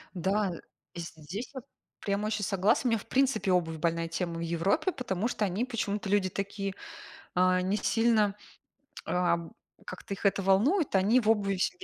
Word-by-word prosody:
Да, 190 +2 0 0.4
здесь 170 +6 -7
я 260 - -5 0.4
прямо 200 +1 -1
очень 215 -1 -1
согласна. 195 +7 +2
У - - +2
меня, 225 - +2
в - - -12
принципе, 265 -6 +1
обувь 170 -3 +1
больная 165 +1 0
тема 170 0 -3
в - - -4
Европе, 170 - +1
потому 220 - -2
что 215 -3 -1
они 200 +4 0
почему-то 210 -5 -3
люди 195 -1 +2
такие, 195 0 -3 0.6
а, 185 0 +4
не 190 +3 0
сильно, 220 -3 +2 0.7
а, 180 -1 +2 0.5
как-то 185 +2 -6
их 195 - -11
это 200 0 +2
волнует. 240 - +3
Они 210 +7 +4
в 215 - -2
обуви 200 -3 +2
вс 185 - +1
195 Hz, 165 wpm, -29 LUFS, 180-220 Hz, 0.7 s, а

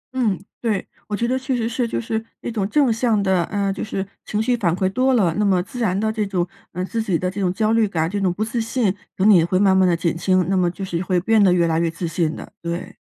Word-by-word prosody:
嗯， 220 -8 +1 0.2
对， 215 -5 -1 0.2
我 210 - -2
觉 235 - 0
得 260 +2 0
确 260 -1 -2
实 230 -1 -1
是 235 +1 -1
就 - - -2
是 225 -1 -3 0.2
一 - - -4
种 205 -3 -2
正 275 -2 +3
向 225 -2 +1
的 190 -3 +2
呃， 200 -1 -1
就 190 - -5
是 195 -2 -3 0.2
情 210 - -1
绪 245 +2 +2
反 185 -8 +1
馈 190 0 0
多 255 +6 +2
了， 185 -8 +3
那 - - +3
么 190 -3 +3
自 225 +5 -9
然 195 -5 +1
的 220 0 0
这 220 -1 -1
种， 180 -3 -1 0.2
呃， 180 +1 -3
自 225 +4 -2
己 195 -6 0
的 180 +2 -2
这 200 +2 -4
种 180 -2 +1
焦 215 +3 0
虑 225 -2 +3
感， 160 -4 -1
这 200 +4 -3
种 185 -2 +2
不 205 +5 -2
自 225 +1 -2
信， 225 -4 0 0.2
等 195 - +2
你 190 -6 +7
会 175 +2 +1
慢 190 0 +4
慢 190 -1 +4
地 170 - +2
减 170 -1 0
轻， 185 +1 +2
那 195 - +2
么 180 -2 +2
就 185 +3 -6
是 170 -2 -2
会 185 -1 +1
变 215 +3 +3
得 190 - +5
越 175 -1 +3
来 165 -1 +1
越 170 0 +1
自 165 +1 -4
信 165 -1 -1
的， - - -10
对。 170 +1 -5
195 Hz, 305 characters per minute, -21 LUFS, 180-225 Hz, 0.2 s, 你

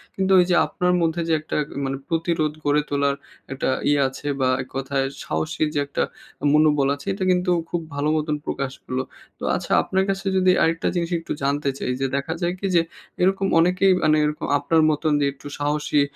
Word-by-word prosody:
কিন্তু 190 0 0
ওই 175 - +5
যে 175 - +4
আপনার 180 0 0
মধ্যে 165 +1 0
যে - - +3
একটা 155 - -5 0.2
এ - - -5
মানে 135 0 -2
প্রতিরোধ 165 -2 0
গড়ে 145 +1 +3
তোলার 140 -1 +1 0.4
একটা 135 - -1 0.2
ইয়া 145 -1 +3
আছে 145 +2 -8
বা 130 - +3
এক 130 - -8
কথায় 135 0 -1 0.2
সাহসী 155 0 -2
যে 145 - 0
একটা - - -1 0.5
মনোবল 150 -3 +4
আছে, 140 - -14
এটা 190 -1 -2
কিন্তু 180 +1 +1 0.2
খুব 175 - -1
ভালো 145 +1 0
মতন 150 0 -1
প্রকাশ 135 -1 -3
হলো। 130 0 -2 0.4
তো - - -10
আচ্ছা - - -5
আপনার 190 0 0
কাছে 195 0 -2
যদি 185 0 +4
আরেকটা 165 0 +1
জিনিস 170 0 -1
একটু 165 - -9
জানতে 140 +1 0
চাই - - -2
যে 135 - +2
দেখা 140 +4 -2
যায় 175 +1 0
কি 195 - -1
যে, 170 - +6 0.4
এরকম 195 +1 +2
অনেকেই 185 +3 +4
মানে 155 0 +4
এরকম 150 0 -3
আপনার 160 +3 +2
মতন 155 +1 0
যে - - +3
একটু 140 +1 -12
সাহসী, 150 0 +1
155 Hz, 200 wpm, -23 LUFS, 140-175 Hz, 0.5 s, যে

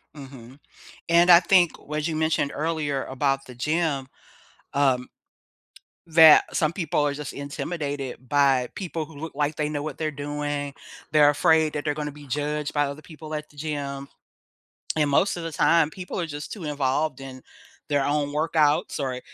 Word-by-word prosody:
Mhm. 135 -2 -12 0.5
And 170 +1 +5
I 170 0 +10
think 180 -1 +3
what 150 +1 -4
you 160 - -2
mentioned 155 -2 0
earlier 150 -3 -2
about 135 +1 -1
the 125 - -11
gym, 150 0 -1 0.6
um, 130 -3 +1 1.0
that 160 -1 +7
some 155 0 +1
people 170 -4 -1
are 145 - 0
just 145 0 -6
intimidated 140 -2 -5
by 135 -2 +3
people 165 -4 -4
who 160 0 -15
look 160 +3 -7
like 145 +1 0
they 150 0 -1
know 145 -1 -3
what 150 -2 -5
they're 155 -1 -2
doing, 145 0 -4 0.4
they're 150 -1 +6
afraid 155 +1 +3
that 150 0 -4
they're 150 - +1
gonna 150 0 -4
be 145 0 -13
judged 150 +2 -2
by 145 -1 +2
other 140 +2 -7
people 155 0 -10
at 150 0 -6
the - - -22
gym 140 -2 -4 0.9
and 150 -2 +2
most 190 +8 +2
of 175 - -5
the 165 - -5
time, 155 +1 +3
people 180 +2 -7
are 170 - -1
just 145 -1 -7
too 195 -6 -7
involved 145 -1 -1
in 130 -1 -9 0.5
their 145 -2 +1
own 145 0 0
workouts, 155 0 +1
or 130 -3 -3
150 Hz, 175 wpm, -25 LUFS, 140-155 Hz, 1.0 s, I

